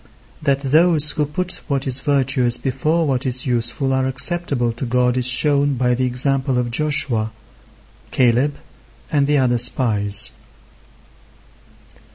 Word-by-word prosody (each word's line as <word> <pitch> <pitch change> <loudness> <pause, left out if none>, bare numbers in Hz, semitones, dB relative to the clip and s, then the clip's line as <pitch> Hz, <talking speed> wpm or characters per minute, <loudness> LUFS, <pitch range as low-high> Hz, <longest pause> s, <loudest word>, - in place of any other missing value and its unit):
That 140 -2 0
those 155 +2 +3
who 150 -2 -2
put 180 +4 -3
what 140 -3 -2
is 130 -1 +1
virtuous 130 -4 +1
before 150 +5 -1
what 130 -3 -1
is 130 -2 -1
useful 125 +2 -1
are 130 0 0
acceptable 130 -2 -1
to 120 +3 -6
God 125 0 +1
is 125 -1 +1
shown 140 +2 +2
by 125 0 0
the 130 +1 -1
example 130 +1 0
of 120 -1 -2
Joshua, 125 -5 +1 0.8
Caleb, 130 +3 +1 0.6
and 145 -3 +1
the 150 0 +2
other 125 -3 +1
spies. 105 -5 +1
130 Hz, 135 wpm, -19 LUFS, 125-145 Hz, 0.8 s, those